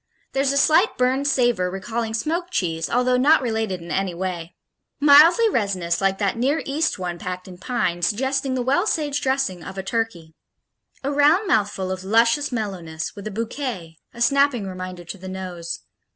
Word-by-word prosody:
There's 275 0 +2
a 280 - 0
slight 320 +8 +4
burned 260 +3 +1
savor 240 -9 +2
recalling 220 +4 -3
smoked 335 +9 -2
cheese, 165 - -2
although 250 +1 +2
not 290 +5 +5
related 220 -7 -2
in 170 - -8
any 190 -3 -1
way. 175 -1 -5 0.4
Mildly 305 +10 +7
resinous 195 - -1
like 195 0 +1
that 200 +2 0
Near 280 +6 +1
East 300 +4 0
one 175 -2 -4
packed 180 +1 -6
in 180 -1 -11
pine, 185 -7 -1
suggesting 265 +8 0
the 250 - -1
well 280 - +1
saged 290 -6 0
dressing 265 -10 -1
of 190 - -9
a 190 - -3
turkey. 195 -7 -3 0.7
A 275 - -1
round 295 +8 +4
mouthful 205 - 0
of 185 0 -4
luscious 230 +8 +2
mellowness, 180 -9 -4
with 200 +1 -7
a - - -2
bouquet 220 - -5
a 235 - -11
snapping 275 -4 +3
reminder 185 -1 -7
to 180 +3 -8
the 190 +1 -8
nose. 180 -3 -6
225 Hz, 175 wpm, -22 LUFS, 185-275 Hz, 0.7 s, Mildly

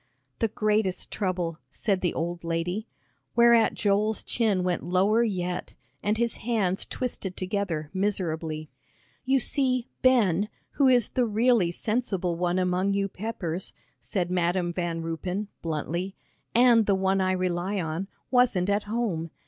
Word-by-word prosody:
"The 225 - +2
greatest 210 -3 0
trouble," 180 -5 -2
said 195 +6 -1
the 180 - 0
old 170 +1 -3
lady, 175 +6 -2 0.5
whereat 235 -1 +5
Joel's 210 +1 +1
chin 210 -6 +1
went 180 -1 0
lower 190 +6 +3
yet, 180 -6 -2 0.3
and 210 +1 +1
his 235 0 0
hands 210 -5 0
twisted 210 -7 -4
together 185 -6 -2
miserably. 165 -6 -2 0.5
"You 265 +1 +4
see 255 -1 0
Ben, 210 -6 +3 0.2
who 275 - +3
is 245 -3 +4
the 250 -2 +1
really 225 -3 +3
sensible 195 -3 -1
one 175 +1 0
among 185 +2 +1
you 195 0 +1
Peppers," 190 -4 -4 0.2
said 180 -3 -2
Madam 175 0 +1
Van 170 -2 -2
Ruypen, 180 +5 -3
bluntly, 170 +4 -3 0.4
"and 235 -2 +6
the 200 - +4
one 190 0 +1
I 185 0 +2
rely 185 +2 -1
on, 165 +3 -3 0.2
wasn't 230 -7 +3
at 205 +1 0
home. 205 -7 -2
190 Hz, 140 wpm, -27 LUFS, 175-220 Hz, 0.5 s, and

